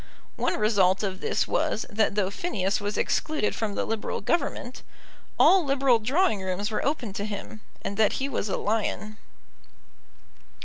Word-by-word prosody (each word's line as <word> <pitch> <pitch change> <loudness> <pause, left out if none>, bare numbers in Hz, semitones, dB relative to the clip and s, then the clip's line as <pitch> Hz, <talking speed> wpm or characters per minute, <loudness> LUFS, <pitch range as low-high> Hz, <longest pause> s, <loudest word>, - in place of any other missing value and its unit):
One - - 0
result 200 -3 +3
of 190 -2 -3
this - - 0
was, 215 - 0
that 215 -1 0
though 195 -2 +1
Phineas 200 - -1
was 205 +1 -2
excluded 305 -9 0
from 210 -3 -3
the - - -1
Liberal 225 -1 -2
Government, 255 - -2 0.6
all 380 -1 +6
Liberal 270 -4 +3
drawing 250 - +1
rooms 190 +3 -2
were 215 - -1
open 260 -8 -1
to 200 - -3
him, 210 +1 -6 0.2
and 200 - -4
that 220 -2 +4
he 270 - -1
was 230 -6 -2
a - - -1
lion. 215 0 -2
215 Hz, 160 wpm, -26 LUFS, 200-255 Hz, 0.6 s, all